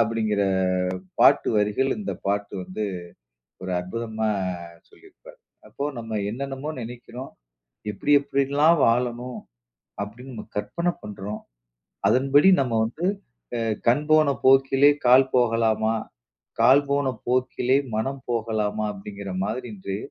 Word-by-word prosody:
அப்டிங்கற 110 Hz, -2 st, +1 dB, 0.8 s
பாட்டு -, -, +5 dB
வரிகள் 105 Hz, +6 st, +1 dB
இந்த 210 Hz, -, -3 dB
பாட்டு 100 Hz, 0 st, -1 dB
வந்து 95 Hz, +4 st, -4 dB, 0.8 s
ஒரு 95 Hz, -, -4 dB
அற்புதமா 110 Hz, +3 st, -3 dB, 0.6 s
சொல்லியிருப்பாரு. -, -, -17 dB, 0.3 s
அப்போ 140 Hz, -, -5 dB
நம்ம 115 Hz, -1 st, -4 dB
என்னென்னமோ 135 Hz, +4 st, -5 dB
நினைக்கிறோம், 120 Hz, +2 st, -8 dB, 0.6 s
எப்டி, 105 Hz, +7 st, -3 dB
எப்படியெல்லாம் 140 Hz, +3 st, +2 dB
வாழணும் 120 Hz, +1 st, 0 dB, 0.7 s
அப்டின்னு 125 Hz, +6 st, -10 dB
நம்ம 110 Hz, -, -8 dB
கற்பனை 170 Hz, +13 st, -1 dB
பண்றோம். 105 Hz, 0 st, -6 dB, 0.7 s
அதன்படி 140 Hz, +6 st, +4 dB
நம்ம 125 Hz, -4 st, -1 dB
வந்து 155 Hz, +11 st, -3 dB, 0.5 s
அ -, -, -2 dB, 0.3 s
"கண் 145 Hz, +5 st, +3 dB
போன 155 Hz, -2 st, +5 dB
போக்கிலே 135 Hz, +1 st, +5 dB, 0.2 s
கால் 130 Hz, +1 st, +6 dB
போகலாமா! 115 Hz, -2 st, +2 dB, 0.7 s
கால் 130 Hz, +5 st, +6 dB
போன 140 Hz, -1 st, +1 dB, 0.2 s
போக்கிலே 130 Hz, +1 st, +1 dB, 0.2 s
மனம் 135 Hz, +4 st, -2 dB
போகலாமா!" 110 Hz, -2 st, -1 dB
அப்டிங்கற 100 Hz, 0 st, -8 dB
மாதிரி 120 Hz, +5 st, -3 dB
இன்று 95 Hz, 0 st, -5 dB
120 Hz, 110 wpm, -24 LUFS, 110-135 Hz, 0.8 s, கால்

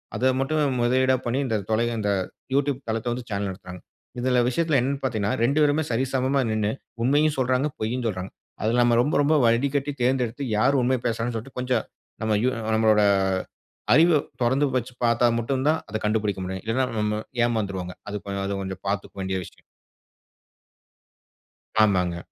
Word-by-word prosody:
அத 130 Hz, -, +2 dB
மட்டும் 145 Hz, -1 st, +1 dB
முதலீடா 130 Hz, +2 st, +3 dB
பண்ணி 120 Hz, +3 st, 0 dB
இந்த 115 Hz, -, 0 dB, 0.2 s
தொலை 115 Hz, +2 st, +2 dB
இந்த 105 Hz, -1 st, 0 dB, 0.4 s
YouTube 140 Hz, -1 st, +1 dB
தளத்த 110 Hz, +2 st, -2 dB
வந்து 120 Hz, 0 st, -7 dB
சேனல் 100 Hz, -1 st, -2 dB
நடத்துறாங்க. 90 Hz, -1 st, -10 dB, 0.4 s
இதுல 125 Hz, 0 st, +2 dB
விஷயத்துல 155 Hz, +3 st, +1 dB
என்னனு 135 Hz, +2 st, -2 dB
பாத்தீங்கன்னா, 110 Hz, -5 st, 0 dB
2 140 Hz, +6 st, +2 dB
பேருமே 150 Hz, +2 st, +2 dB
சரி 120 Hz, +3 st, +1 dB
சமமா 135 Hz, +1 st, +1 dB
நின்னு 110 Hz, -1 st, 0 dB, 0.3 s
உண்மையும் 145 Hz, +3 st, +3 dB
சொல்லுறாங்க, 130 Hz, +2 st, +1 dB
பொய்யும் 120 Hz, +3 st, -2 dB
சொல்லுறாங்க. 95 Hz, -3 st, -3 dB, 0.3 s
அதுல 115 Hz, +3 st, +1 dB
நம்ப 120 Hz, -1 st, +3 dB
ரொம்ப, 145 Hz, +5 st, 0 dB
ரொம்ப 155 Hz, +2 st, +3 dB
வடிகட்டி 135 Hz, +5 st, +1 dB
தேர்ந்தெடுத்து 125 Hz, +1 st, 0 dB
யார் 135 Hz, +5 st, +3 dB
உண்மைய 125 Hz, 0 st, +1 dB
பேசுறாங்கன்னு 115 Hz, +1 st, -1 dB
சொல்லிட்டு 125 Hz, +4 st, -9 dB
கொஞ்சம் 125 Hz, 0 st, 0 dB, 0.4 s
நம்ப 110 Hz, -1 st, +1 dB
யு 130 Hz, -, +3 dB, 0.3 s
நம்மளோட 110 Hz, -1 st, +4 dB, 0.9 s
அறிவை 160 Hz, 0 st, +5 dB, 0.2 s
தொறந்து 135 Hz, +4 st, +2 dB
வச்சு 125 Hz, +1 st, -4 dB
பாத்தா 120 Hz, +1 st, +3 dB
மட்டும் 130 Hz, +3 st, -1 dB
தான், 160 Hz, +1 st, +2 dB
அத 110 Hz, -, -2 dB
கண்டுபிடிக்க 105 Hz, -3 st, 0 dB
முடியும். 95 Hz, 0 st, -5 dB
இல்லன்னா, 130 Hz, +4 st, +1 dB
ந -, -, -4 dB
நம்ம 105 Hz, 0 st, -1 dB, 0.2 s
ஏமாந்துறுவோங்க. 100 Hz, -6 st, -2 dB
அது 105 Hz, -, -3 dB
கொஞ் 100 Hz, -1 st, -3 dB
அது 100 Hz, 0 st, -2 dB
கொஞ்சம் 95 Hz, -1 st, -6 dB
பாத்துக்க 100 Hz, 0 st, -3 dB
வேண்டிய 95 Hz, 0 st, -2 dB
விஷயம். -, -, -16 dB, 2.2 s
ஆமாங்க. 90 Hz, -4 st, +1 dB
120 Hz, 160 wpm, -24 LUFS, 105-135 Hz, 2.2 s, அறிவை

